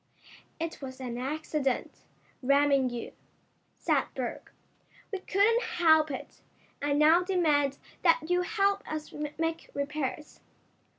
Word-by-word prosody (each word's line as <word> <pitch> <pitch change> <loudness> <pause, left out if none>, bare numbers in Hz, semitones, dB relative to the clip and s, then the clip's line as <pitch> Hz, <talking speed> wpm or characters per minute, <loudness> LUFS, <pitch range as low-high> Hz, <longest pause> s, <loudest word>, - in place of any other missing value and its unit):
"It 330 0 -4
was 260 -1 -7
an 245 -2 -4
accident, 285 0 -2 0.4
ramming 275 0 +3
you," 240 -1 -6 0.7
said - - +1
Berg. - - -4 0.6
"We 390 - -1
couldn't 415 +5 +3
help 330 -9 +4
it. 270 - -7 0.4
I 290 0 0
now 310 +4 +6
demand 305 -7 +2 0.2
that 330 -2 +4
you 355 +1 +2
help 400 0 +1
us 310 -1 -5 0.2
make 325 0 -2
repairs." 295 +1 -3
310 Hz, 115 wpm, -29 LUFS, 280-355 Hz, 0.7 s, now